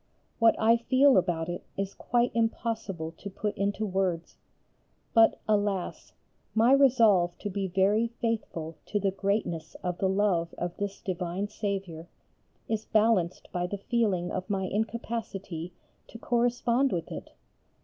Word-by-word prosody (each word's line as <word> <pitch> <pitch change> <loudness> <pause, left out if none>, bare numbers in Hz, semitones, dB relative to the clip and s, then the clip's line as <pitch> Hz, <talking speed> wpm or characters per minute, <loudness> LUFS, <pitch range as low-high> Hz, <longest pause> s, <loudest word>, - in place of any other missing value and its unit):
What 230 -1 +6
I 230 +1 +5
feel 260 +4 +4
about 175 -3 +1
it 175 0 -5
is 195 0 -2
quite 240 0 +1
impossible 220 -7 -2
to 200 - -6
put 210 +2 -3
into 200 +2 -1
words. 185 -4 -1 0.8
But, 225 -1 +5
alas! 205 -3 -1 0.4
my 225 +3 +5
resolve 225 -10 +5
to 205 - -5
be 195 0 -2
very 195 +5 +2
faithful 225 -9 -3
to 205 - 0
the 195 -1 +1
greatness 195 -4 -2
of 180 -1 -2
the 190 - +2
love 190 -4 +1
of 175 0 -3
this 200 -1 -4
divine 180 +2 -3
Saviour 195 -6 -4 0.6
is 220 -1 -2
balanced 215 -5 +1
by 180 0 -1
the 200 - -4
feeling 200 -5 0
of 185 - -4
my 195 -2 0
incapacity 200 -4 -3 0.4
to - - -10
correspond 240 +2 +1
with 170 -2 -3
it. - - -8
200 Hz, 140 wpm, -28 LUFS, 180-225 Hz, 0.8 s, What